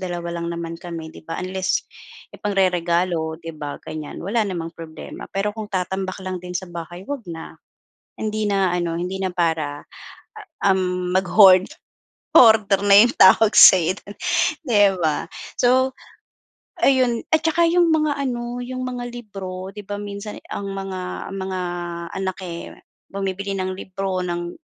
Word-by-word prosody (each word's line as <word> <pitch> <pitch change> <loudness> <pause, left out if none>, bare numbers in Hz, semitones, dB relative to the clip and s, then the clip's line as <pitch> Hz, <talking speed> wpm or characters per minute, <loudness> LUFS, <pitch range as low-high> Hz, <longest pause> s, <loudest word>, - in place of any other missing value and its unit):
dalawa 170 -2 -4
lang 170 - -3
naman 170 -1 -5
kami 165 -2 -7
'di 160 - -15
ba, - - -3
unless 185 0 -1 0.6
ipangreregalo 175 -4 0
'di 165 -1 -7
ba 145 -1 -5
ganiyan 155 -1 -7
wala 220 +5 0
namang 170 -4 -4
problema. 160 -1 -9
Pero 200 +2 -1
kung 215 -1 -7
tatambak 190 0 -3
lang 185 0 -3
din 180 0 -8
sa 185 - -5
bahay, 175 +1 -8
huwag 285 +4 -4
na, 165 -1 -7 0.7
hindi 215 0 -1
na 195 -2 +2
ano 170 -1 -2
hindi 180 +2 -3
na 190 -1 -2
para, 160 -5 -1 0.9
um, 180 -2 +1
mag-hoard, 185 0 +6 0.7
hoarder 215 -4 +6
na 200 - +7
'yung 240 +1 +2
tawag 200 +3 +7
sa'yo 185 0 +8
do'n, 205 - -11 0.5
'di 230 -5 +3 0.2
ba? 155 0 0 0.3
So 260 +1 +3 0.9
ayun 255 -4 +3
at 315 0 +2
saka 325 +1 +2
'yung 345 +1 +4
mga 305 -2 +1
ano, 240 -3 -3
'yung 255 +1 -5
mga 250 -1 -4
libro, 195 -5 -7
di 210 +1 -10
ba, 205 0 -4
minsan 205 +1 -7
ang 200 - -4
mga 190 -2 -5
mga 190 -1 -3 0.6
anak, 190 -1 -2
eh, 170 -2 -7 0.4
bumibili 195 0 -3
ng 185 0 -2
libro 190 -1 -3
ng, 175 -1 -4
190 Hz, 150 wpm, -22 LUFS, 175-210 Hz, 0.9 s, sa'yo